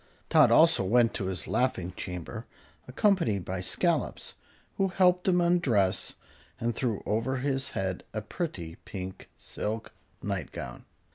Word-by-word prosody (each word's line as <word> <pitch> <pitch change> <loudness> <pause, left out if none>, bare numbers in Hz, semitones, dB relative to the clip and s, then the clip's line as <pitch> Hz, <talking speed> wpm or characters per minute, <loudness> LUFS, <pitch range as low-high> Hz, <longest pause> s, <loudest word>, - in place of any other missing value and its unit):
Tot - - +7
also - - +6
went 115 +4 +4
to 100 - -3
his 95 0 -4
laughing 95 -8 0
chamber, 90 -3 -6 0.4
accompanied 130 - +2
by 95 0 -3
Scollops, 90 - -1 0.4
who 195 - +3
helped 180 -1 +3
him 180 -1 +4
undress 140 - +2 0.4
and 120 0 0
threw 115 -5 -2
over 115 +5 0
his 135 0 0
head 95 -1 -2
a 110 - -2
pretty 95 - -5
pink 95 -1 -7
silk 110 +1 -4 0.3
nightgown. 90 -10 -5
110 Hz, 130 wpm, -29 LUFS, 95-140 Hz, 0.4 s, Tot